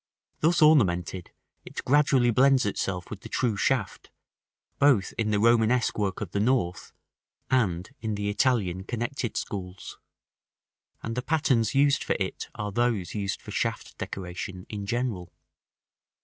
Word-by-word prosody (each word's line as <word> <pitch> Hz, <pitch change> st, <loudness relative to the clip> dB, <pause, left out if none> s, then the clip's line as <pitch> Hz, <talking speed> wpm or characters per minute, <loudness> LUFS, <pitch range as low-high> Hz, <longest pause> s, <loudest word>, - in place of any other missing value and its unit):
Thus 165 Hz, +1 st, +3 dB
ornamented, 95 Hz, -, +3 dB, 0.3 s
it -, -, -7 dB
gradually 135 Hz, -3 st, +4 dB
blends 130 Hz, +1 st, +4 dB
itself 95 Hz, -3 st, -3 dB
with -, -, -6 dB
the -, -, -10 dB
true 120 Hz, -4 st, 0 dB
shaft, 105 Hz, 0 st, -1 dB, 0.7 s
both 130 Hz, -10 st, +3 dB
in 110 Hz, -1 st, -1 dB
the 105 Hz, -1 st, +1 dB
Romanesque 115 Hz, +1 st, +3 dB
work 100 Hz, -3 st, -2 dB
of 100 Hz, -5 st, -5 dB
the 100 Hz, -, -1 dB
North, 105 Hz, -6 st, 0 dB, 0.6 s
and 95 Hz, -9 st, +1 dB
in 110 Hz, -2 st, -3 dB
the 100 Hz, 0 st, -3 dB
Italian 105 Hz, -4 st, +1 dB
connected 120 Hz, +3 st, -3 dB
schools; 90 Hz, -2 st, -6 dB, 1.0 s
and 115 Hz, -, -3 dB
the 125 Hz, -, -1 dB
patterns 130 Hz, -6 st, +1 dB
used 140 Hz, 0 st, +3 dB
for -, -, 0 dB
it -, -, -3 dB
are 105 Hz, -1 st, -4 dB
those 115 Hz, -5 st, 0 dB
used 100 Hz, -2 st, -3 dB
for -, -, -9 dB
shaft -, -, -3 dB
decoration 90 Hz, 0 st, -6 dB
in 100 Hz, -2 st, -5 dB
general. 115 Hz, -7 st, -2 dB
110 Hz, 140 wpm, -27 LUFS, 95-125 Hz, 1.0 s, gradually